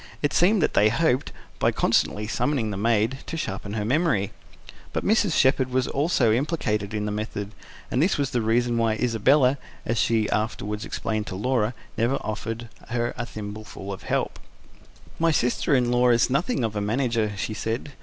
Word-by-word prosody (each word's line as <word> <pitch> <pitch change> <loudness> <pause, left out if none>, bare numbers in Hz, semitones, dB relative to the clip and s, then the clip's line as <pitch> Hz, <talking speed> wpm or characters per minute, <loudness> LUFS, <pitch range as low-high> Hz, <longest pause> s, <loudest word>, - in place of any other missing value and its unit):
It 145 - +1
seemed 185 +1 +4
that - - +1
they 105 - +5
hoped, 130 +1 +1 0.3
by - - +3
constantly 105 +1 +1
summoning 115 0 0
the - - -3
maid, 115 +4 +1
to 165 - -4
sharpen 100 -7 -4
her 105 -1 -2
memory. 130 - +1 0.6
But - - -2
Mrs. 205 -4 +3
Shepherd 130 -1 +3
was 130 0 +1
also 140 -6 +2
implicated 110 - -1
in 105 0 -1
the 105 - -2
method; 105 -1 -4 0.4
and 125 - +2
this 180 +4 +2
was 140 -2 -1
the 120 -3 0
reason 120 +2 +1
why 115 -1 +2
Isabella 125 +4 +3 0.3
as 115 0 0
she 110 -2 +2
afterwards 105 -1 -2
explained 110 -1 -3
to 95 - -5
Laura 115 +2 0 0.2
never 120 +4 +2
offered 115 +2 -4 0.2
her 120 0 -1
a 120 -1 -4
thimbleful 105 -2 -7
of 95 - -8
help. - - -2 0.8
"My 165 0 +3
sister 140 0 +2
in 125 -2 +2
law 125 0 +4
is 120 +1 +3
nothing 150 - 0
of 110 -2 -2
a 105 - -1
manager," 115 -1 0
she 110 - -3
said. 115 +6 -3
115 Hz, 180 wpm, -25 LUFS, 105-135 Hz, 0.8 s, they